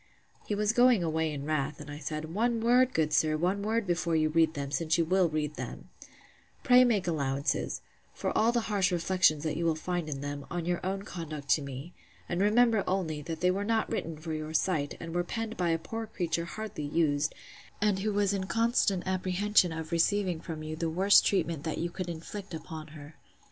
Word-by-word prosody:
He 210 - 0
was 210 +1 +1
going 245 -5 +5
away 160 -1 0
in 140 -1 -5
wrath; 150 -1 -1
and 150 0 -8
I 145 - -7
said, 155 +1 -5
One 230 +3 +1
word, 245 +3 +4
good 155 -1 +1
sir, 155 0 +3
one 185 +5 0
word 220 +2 0
before 170 -2 0
you 155 -1 +2
read 160 0 +2
them, 140 -1 -4
since 155 +3 +1
you 165 - +2
will 185 +1 +3
read 150 -1 -2
them: - - -7 0.7
Pray 250 -1 +7
make 220 -6 +2
allowances—for 140 -4 -3
all 225 +2 +4
the 240 0 +1
harsh 205 -4 +1
reflections 175 -3 +2
that 155 -2 -1
you 170 - -1
will 165 -1 +2
find 175 0 -3
in 135 -2 -4
them, 145 0 -5
on 175 -1 -3
your 175 0 -1
own 195 +2 -2
conduct 155 -7 -7
to 155 - +4
me: 140 +5 -7 0.3
And 175 +1 -1
remember 220 0 +4
only, 165 -6 -1
that 160 +2 -6
they 180 0 +4
were 195 +2 -1
not 225 +1 0
written 165 -1 -3
for 160 +1 -5
your 155 0 -4
sight; 150 -4 0
and 165 - -7
were 175 0 +1
penned 225 +4 -4
by 175 -2 0
a 165 - +2
poor 225 +7 -6
creature 170 -5 -2
hardly 200 -1 -6
used, 145 -1 +1 0.4
and 205 -2 +2
who 210 +2 0
was 205 -1 +1
in 190 -1 -2
constant 225 -5 +1
apprehension 185 0 +2
of 160 0 -6
receiving 180 +1 +1
from 155 -2 -6
you 155 0 -5
the 165 +1 -2
worst 190 +5 +5
treatment 170 -6 0
that 160 - -3
you 170 0 -2
could 185 -1 -5
inflict 175 +3 -7
upon 160 0 -8
her. 150 0 -12
170 Hz, 210 wpm, -30 LUFS, 155-200 Hz, 0.7 s, Pray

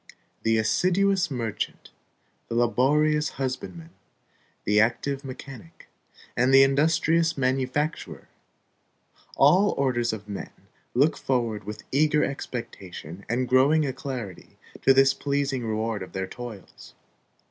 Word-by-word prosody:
The 115 0 +2
assiduous 185 - +2
merchant, 115 -6 -4 0.6
the 115 - -4
laborious 150 +6 +2
husbandman, 135 +5 -5 0.7
the 105 0 +3
active 135 +5 0
mechanic, 130 - -11 0.5
and 125 +2 +2
the 135 0 +8
industrious 160 +4 +2
manufacturer, 135 +4 -2 1.1
all 185 +9 +4
orders 120 -3 +1
of 105 -1 -7
men, 100 -1 -6 0.5
look 145 +5 +3
forward 115 -6 -2
with 105 +1 -7
eager 150 +2 +3
expectation 100 - -6
and 125 +2 0
growing 140 +5 +4
alacrity 130 -7 -6 0.2
to - - +5
this 135 0 +5
pleasing 140 -2 -1
reward 110 -1 -2
of 95 - -8
their 95 0 -2
toils. 115 -1 -10
130 Hz, 110 wpm, -25 LUFS, 115-145 Hz, 1.1 s, the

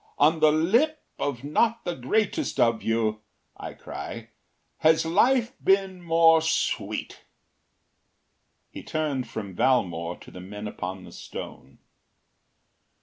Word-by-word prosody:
‘On 155 +3 +4
the 155 -1 +5
lip 235 - +2 0.2
of 135 -3 -2
not 225 +11 +1
the 175 - -1
greatest 215 - -1
of 115 -1 +3
you,’ 110 -1 0 0.3
I - - -8
cry, - - -8 0.5
‘has 160 +1 +4
life 240 +8 +3
been 195 -1 +2
more 165 -1 +5
sweet.’” 160 0 -2 1.5
He - - -8
turned 150 -5 -2
from 100 -3 -6
Valmore 90 -10 +1
to - - -13
the 90 - -10
men 105 +3 -7
upon 95 -2 -6
the - - -12
stone. 65 +1 -9
155 Hz, 120 wpm, -26 LUFS, 110-180 Hz, 1.5 s, the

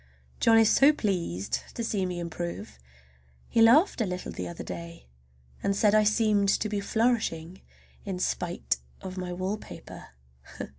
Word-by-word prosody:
John 225 0 +5
is 225 -1 +5
so 275 +2 +6
pleased 175 - -2
to 235 - -3
see 200 -4 -1
me 180 -1 -4
improve! 170 - -6 0.7
He 230 - +2
laughed 250 - +5
a - - +2
little 180 0 -5
the 90 - -5
other 85 - -7
day, 85 -6 -8 0.6
and 200 - 0
said 205 0 +3
I 215 0 +5
seemed 210 -2 +3
to 215 - +1
be 210 -1 -2
flourishing 200 -6 -1 0.4
in 195 -3 -4
spite 65 - -1 0.3
of 185 -1 -6
my 180 -1 -4
wallpaper. 185 +4 -6
195 Hz, 150 wpm, -27 LUFS, 170-220 Hz, 0.7 s, so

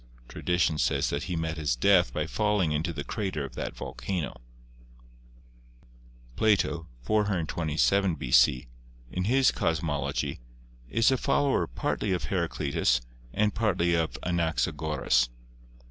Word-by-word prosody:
Tradition 90 -3 0
says - - +1
that 70 - -2
he 90 - -3
met 80 0 -2
his 75 -5 0
death 90 +7 +4
by 75 - -2
falling 105 -1 +1
into 80 +3 -1
the 75 -3 -5
crater 95 -6 -3
of 65 - -10
that - - -5
volcano. 85 -10 -4 1.9
Plato 100 -6 +1 0.2
(427 85 - +1
B.C.), 65 -1 +3 0.4
in 90 +5 -2
his 130 +4 +4
Cosmology, 80 -6 -1 0.5
is 115 +2 +3
a 130 - +2
follower 140 +2 +1
partly 95 - -2
of 90 - -2
Heraclitus 70 -8 0 0.3
and 105 - +1
partly 90 -6 +1
of 80 -1 0
Anaxagoras. 80 -6 +1
85 Hz, 115 wpm, -28 LUFS, 75-100 Hz, 1.9 s, death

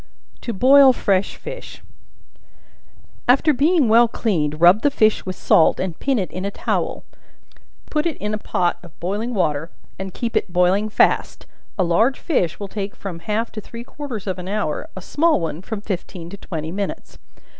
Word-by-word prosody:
To 235 - -4
Boil 265 +5 +6
Fresh 195 -4 0
Fish. - - -9 1.4
After 275 +5 +4
being 295 +1 +3
well 230 +2 +6
cleaned, 155 -10 -1
rub 175 +5 +6
the 290 - +3
fish 215 -7 +2
with 185 - -3
salt, 160 - +3
and 185 -3 -3
pin 275 -2 +1
it 190 -4 -2
in 185 - -5
a 200 - -1
towel; - - -2 0.9
put 305 +2 +1
it 320 - -3
in 210 +1 -3
a 215 - -2
pot 175 -4 -1
of 175 -3 -16
boiling 205 +7 -2
water, 155 -4 0 0.3
and 190 0 -5
keep 230 +4 -4
it - - 0
boiling 185 +4 +2
fast; - - +1 0.3
a 190 - +2
large 220 +10 +2
fish 185 - -1
will 200 - -5
take 200 0 -5
from 180 -4 -7
half 215 +6 -2
to 215 - -7
three 230 +3 -9
quarters 245 -6 -7
of 190 -2 -3
an 180 - -7
hour 200 -6 -2
a 190 - -7
small 325 - +2
one, 165 -1 -4
from 215 +1 -5
fifteen 180 -4 -6
to 200 - -8
twenty 160 -5 -5
minutes. 200 +2 -5
205 Hz, 180 wpm, -21 LUFS, 180-240 Hz, 1.4 s, Boil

